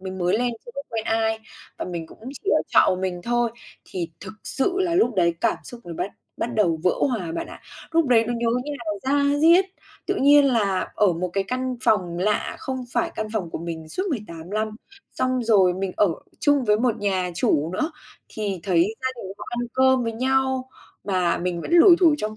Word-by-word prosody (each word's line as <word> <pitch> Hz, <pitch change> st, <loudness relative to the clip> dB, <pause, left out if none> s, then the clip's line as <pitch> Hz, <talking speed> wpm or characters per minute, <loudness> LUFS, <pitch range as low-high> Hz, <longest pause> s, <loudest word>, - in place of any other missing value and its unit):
mình 190 Hz, 0 st, -6 dB
mới 180 Hz, +4 st, +1 dB
lên 245 Hz, -1 st, 0 dB
chưa 240 Hz, -, -9 dB
có 280 Hz, -, -4 dB
quen 225 Hz, -1 st, -3 dB
ai, 220 Hz, 0 st, +1 dB, 0.4 s
và -, -, -3 dB
mình 170 Hz, -3 st, -5 dB
cũng -, -, -16 dB, 0.2 s
chỉ 405 Hz, -, 0 dB
ở -, -, +3 dB
trọ -, -, +5 dB
một 185 Hz, -, +2 dB
mình 185 Hz, -2 st, -2 dB
thôi, 240 Hz, +1 st, +1 dB, 0.3 s
thì 175 Hz, -3 st, -5 dB
thực 190 Hz, -1 st, -8 dB
sự 270 Hz, +7 st, 0 dB
là 345 Hz, -2 st, +1 dB
lúc 245 Hz, -, +3 dB
đấy 170 Hz, -2 st, +2 dB
cảm 230 Hz, -2 st, +2 dB
xúc 240 Hz, -1 st, -10 dB
mình 170 Hz, -2 st, -7 dB
bắt 200 Hz, -, -2 dB, 0.3 s
bắt 240 Hz, +1 st, -3 dB
đầu 175 Hz, -7 st, +2 dB
vỡ 180 Hz, -, +5 dB, 0.2 s
hòa 185 Hz, -10 st, -3 dB
bạn -, -, -3 dB
ạ. -, -, -11 dB, 0.3 s
Lúc 330 Hz, -2 st, +3 dB
đấy 230 Hz, -2 st, +4 dB
nó 240 Hz, -, -1 dB
nhớ 235 Hz, 0 st, -1 dB, 0.2 s
như 295 Hz, -, -4 dB
là 235 Hz, -, -9 dB, 0.2 s
da 285 Hz, +1 st, +2 dB
diết, 335 Hz, +5 st, +6 dB, 0.4 s
tự -, -, 0 dB
nhiên 285 Hz, +1 st, +6 dB
là 205 Hz, -8 st, +1 dB
ở 200 Hz, -4 st, +3 dB
một 180 Hz, +2 st, -2 dB
cái 195 Hz, -1 st, 0 dB
căn 255 Hz, 0 st, -2 dB
phòng 180 Hz, -5 st, +2 dB
lạ 210 Hz, +3 st, 0 dB
không 260 Hz, -1 st, -4 dB
phải -, -, 0 dB
căn 215 Hz, -, -3 dB
phòng 185 Hz, -7 st, -2 dB
của -, -, -4 dB
mình 165 Hz, -1 st, -6 dB
suốt 370 Hz, -, -3 dB
18 180 Hz, -, -6 dB
lăm, 215 Hz, +1 st, -2 dB, 0.4 s
xong 255 Hz, -1 st, 0 dB
rồi 190 Hz, -5 st, +4 dB
mình 190 Hz, -1 st, -3 dB
ở 205 Hz, -, +4 dB, 0.3 s
chung 285 Hz, -3 st, +3 dB
với 210 Hz, -2 st, +4 dB
một 235 Hz, -1 st, +1 dB
nhà 185 Hz, -3 st, 0 dB
chủ 160 Hz, -2 st, +1 dB
nữa. 310 Hz, -, -1 dB, 0.4 s
Thì 200 Hz, -5 st, -4 dB
thấy 185 Hz, +2 st, +2 dB
gia 260 Hz, -, 0 dB
đình 190 Hz, 0 st, -6 dB
họ -, -, -7 dB
ăn 240 Hz, -, -4 dB, 0.2 s
cơm 260 Hz, -1 st, +4 dB
với 230 Hz, -, -2 dB
nhau, 260 Hz, +1 st, 0 dB, 0.3 s
mà 185 Hz, -4 st, +1 dB
mình 175 Hz, -1 st, -2 dB
vẫn -, -, -6 dB
lủi 345 Hz, +1 st, +8 dB
thủi 330 Hz, -4 st, +6 dB
trong 215 Hz, 0 st, -4 dB
220 Hz, 225 wpm, -23 LUFS, 185-255 Hz, 0.4 s, lủi